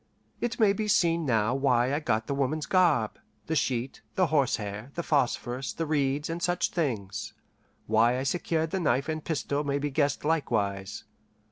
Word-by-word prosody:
It 240 0 -2
may 210 -3 +5
be 215 +1 -2
seen 170 -7 +2
now 115 -1 +2
why 130 -1 +2
I 145 - +1
got 110 -7 0
the 140 - -2
woman's 140 +2 -1
garb, 170 - +2 0.3
the 160 - -1
sheet, 130 -3 -1
the 185 - +3
horsehair, 110 -5 0
the 170 - -2
phosphorus, 130 -4 0
the 165 - -2
reeds, 145 -1 0
and 165 +1 -4
such 175 0 0
things; 105 - -3 0.5
why 115 +3 +3
I 130 - -2
secured 160 +1 -1
the 190 - -1
knife 140 -4 +1
and 155 -1 -3
pistol 145 -2 -1
may 140 -1 0
be 145 0 -2
guessed 145 0 0
likewise. 105 -10 -1
140 Hz, 170 wpm, -28 LUFS, 120-160 Hz, 0.5 s, may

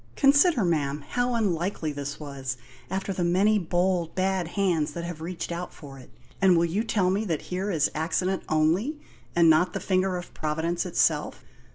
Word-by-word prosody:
Consider, 285 - +4
ma'am, 145 -3 -1
how 245 0 0
unlikely 180 -6 -1
this 140 -1 -5
was, 135 -4 -5 0.3
after 190 +1 -2
the 180 - -2
many 195 +5 +3
bold, 175 -1 0
bad 190 -2 0
hands 170 -5 0
that 170 - -5
have 170 -2 -6
reached 175 +1 -5
out 175 +1 -5
for 135 -2 -11
it. 125 - -14 0.3
And 185 -3 +5
will 170 - +3
you 185 +6 -1
tell 195 -5 +1
me 200 +3 0
that 165 -6 -2
here 190 +3 -1
is 160 -6 +1
accident 180 +4 -1
only, 170 - +1 0.4
and 170 -1 +5
not 160 +3 +4
the - - -2
finger 185 -1 0
of 175 - -9
Providence 160 +3 -2
itself? 175 - +1
175 Hz, 180 wpm, -26 LUFS, 160-190 Hz, 0.4 s, And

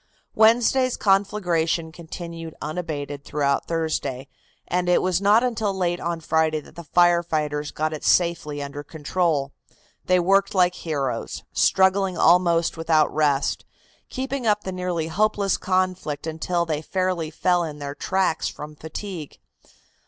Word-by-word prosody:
Wednesday's 240 +3 +4
conflagration 180 -5 +1
continued 165 -1 -8
unabated 150 -3 -5
throughout 140 -1 0
Thursday, 155 -5 -2 0.4
and 180 0 0
it 180 - +5
was 185 0 0
not 210 +4 +5
until 225 -4 0
late 175 -2 0
on 170 -1 -3
Friday 160 -1 +1
that 150 - -15
the 170 - -8
fire 175 +2 +4
fighters 150 -3 -2
got 155 +1 -2
it 155 - -6
safely 160 -5 +1
under 140 +1 -6
control. 155 -1 -1 0.5
They 185 0 +3
worked 195 +3 +2
like 180 -1 +4
heroes, 145 -7 -3
struggling 190 -1 +3
almost 170 -1 +3
without 160 -2 +2
rest, 145 -2 +1 0.5
keeping 265 -1 -3
up 210 -1 +2
the 190 - -4
nearly 180 -3 -2
hopeless 200 +2 +1
conflict 185 -5 -1
until 170 +2 -1
they 155 -2 -2
fairly 185 -1 -1
fell 175 +2 +1
in 155 -3 -5
their 140 -1 -5
tracks 190 +2 0
from 150 +1 -8
fatigue. 160 +1 -7
170 Hz, 135 wpm, -23 LUFS, 155-185 Hz, 0.5 s, it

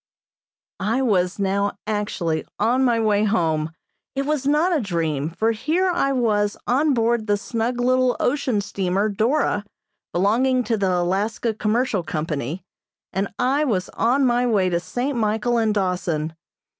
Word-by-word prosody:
I 225 +7 0
was 185 -6 +1
now 200 0 0
actually 185 -7 -1
on 245 +5 +2
my 240 -3 +3
way 210 -2 +2
home. 160 -7 +1 0.4
It 275 - 0
was 290 -2 -1
not 315 +5 +3
a 300 - +1
dream, 160 -7 -1
for 220 +7 0
here 315 - 0
I 340 -6 +1
was 210 -5 +1
on 280 +3 +2
board 230 -1 +1
the 205 0 +2
snug 235 +3 -2
little 255 0 +2
ocean 250 -5 +1
steamer 195 +1 -1
"Dora," 220 +1 +1 0.5
belonging 245 +8 +2
to 225 0 0
the 195 -3 0
Alaska 195 +6 0
Commercial 215 -1 0
Company, 155 0 -3 0.5
and 195 +1 0
I 275 +4 +2
was 200 -10 -1
on 260 +4 +2
my 245 0 +2
way 200 -5 +2
to 170 -1 0
St. 245 - -3
Michael 225 +1 +1
and 220 -1 +2
Dawson. 180 -6 -1
215 Hz, 150 wpm, -22 LUFS, 190-250 Hz, 0.5 s, my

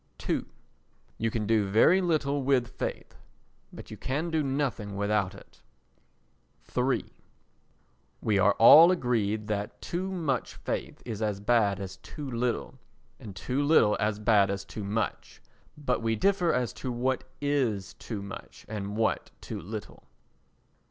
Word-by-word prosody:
ii - - +1 0.8
You 115 - +1
can 110 -1 -2
do 105 -2 +2
very 165 - +5
little 150 -5 +1
with 130 -2 +2
faith, - - -5 0.5
but - - -11
you - - -7
can 155 +6 -2
do 160 -1 +1
nothing 135 -7 -2
without 100 -1 0
it. - - -17 1.1
iii 125 +1 +1 1.1
We 105 -2 +1
are 100 +2 +5
all 155 - +9
agreed 110 - 0
that 105 -1 -3
too 185 +2 -3
much 155 -9 -2
faith - - -5
is 110 -2 -5
as 105 -2 -1
bad 105 -3 +2
as 95 -1 -6
too 145 -2 -8
little, 120 0 -2 0.4
and 100 -4 -9
too 125 +9 -2
little 145 -8 +4
as 105 0 0
bad 105 -2 +4
as 100 0 -3
too 100 +2 -7
much; 105 +1 -3 0.4
but 130 -5 -1
we 115 0 +1
differ 185 - +2
as 125 -2 0
to 130 - -2
what 125 +2 -1 0.2
is 130 -10 0
too 105 -4 -6
much 100 - -10
and 105 -1 -5
what 110 0 0
too - - -6
little. 105 +4 -8
115 Hz, 145 wpm, -28 LUFS, 105-140 Hz, 1.1 s, all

